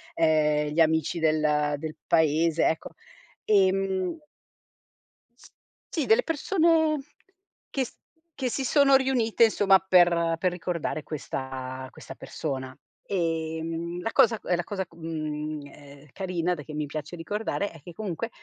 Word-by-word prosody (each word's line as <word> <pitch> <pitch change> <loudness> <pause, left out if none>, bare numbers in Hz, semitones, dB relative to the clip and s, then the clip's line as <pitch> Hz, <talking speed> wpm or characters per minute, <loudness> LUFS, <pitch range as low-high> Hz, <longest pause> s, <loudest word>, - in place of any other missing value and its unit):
ehm, 150 -2 +2
gli 165 - +3
amici 160 +1 +2
del 150 -2 +2
del 155 0 -5
paese, 160 +1 +3
ecco. 160 - -2 0.6
Ehm 190 - +2 1.8
Sì, 315 - 0
delle 450 +3 +4
persone 320 -1 +2 0.7
che 265 -2 -1
s - - -13 0.4
che 260 -2 -1
si 270 - -2
sono 275 0 +5
riunite, 240 -4 +3
insomma, 195 -3 +4
per 170 -3 +4
per 180 +1 +1
ricordare 170 -3 -3
questa 130 -3 -5
questa - - -11
persona. 130 -3 -5 0.3
Ehm, 165 -1 -2
la 225 - -2
cosa 225 -1 +4
è 180 - +1
la 175 - -2
cosa, 190 0 -4
mhmm, 155 -2 -4
ehm, 145 0 -14
carina, 180 -2 -1
da 155 - -6
che 155 - -10
mi 150 0 -2
piace 155 +4 -6
ricordare, 205 +3 -3
è 165 - -13
che 175 +3 -11
comunque, 215 +2 -4
170 Hz, 135 wpm, -27 LUFS, 155-200 Hz, 1.8 s, sono